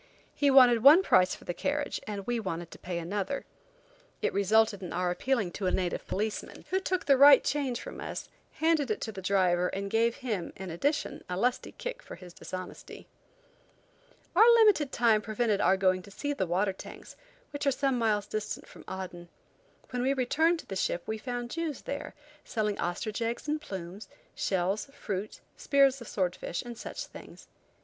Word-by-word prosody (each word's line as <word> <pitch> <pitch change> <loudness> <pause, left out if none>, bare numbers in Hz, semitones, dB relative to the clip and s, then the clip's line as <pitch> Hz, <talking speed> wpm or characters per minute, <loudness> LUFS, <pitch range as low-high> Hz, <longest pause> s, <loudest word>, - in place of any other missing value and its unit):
He 285 - +2
wanted 250 -4 +7
one 300 +9 +8
price 185 - +4
for - - -16
the 175 - -3
carriage 285 +10 -2
and 200 -2 -5
we 240 -1 -1
wanted 175 -5 -4
to - - -12
pay 175 -1 -4
another. 200 +10 -3 0.7
It - - -1
resulted 205 +1 +3
in 180 - -6
our 180 +1 0
appealing 210 -1 0
to 195 0 -3
a - - +2
native 180 -2 -2
policeman, 215 +2 -4
who 380 - +2
took 370 -1 -2
the 275 -2 +4
right 280 -1 +9
change 270 -5 -1
from - - -8
us, - - -5 0.3
handed 315 -4 +1
it 215 - -1
to 220 - -3
the 195 - -8
driver, 180 -2 +2
and 195 +1 -4
gave 230 +1 +2
him, 210 -9 -4
in 190 -2 -7
addition, 285 - -1
a 180 - -2
lusty 245 +5 0
kick - - -6
for - - -10
his 180 -1 -13
dishonesty. 185 0 -8 1.3
Our 445 +6 +8
limited 415 - +4
time 225 -3 +3
prevented 215 -1 0
our 190 - +4
going 185 -1 +2
to 200 - -14
see 290 +8 -3
the 190 -10 -2
water 190 +3 +1
tanks, - - -11 0.4
which 285 0 -3
are - - +5
some 270 -2 0
miles 210 -3 +1
distant 215 0 -4
from - - -14
Aden. 180 -2 -7 0.6
When 250 -1 -2
we 265 +2 +2
returned 320 +7 +2
to - - -23
the 195 - -6
ship 175 -2 -1
we 220 0 -3
found 245 0 -4
Jews 330 -4 -3
there, 280 - -5 0.3
selling 210 -3 -2
ostrich 210 +6 -3
eggs 230 +5 -2
and 300 +1 -1
plumes, 190 - -7 0.2
shells, 190 +6 -1
fruit, 200 0 -5 0.2
spears 275 -2 +3
of 235 - -9
sword 185 -3 -1
fish, 170 - -4
and 240 -1 -7
such - - -6
things. - - -13
220 Hz, 190 wpm, -29 LUFS, 190-275 Hz, 1.3 s, right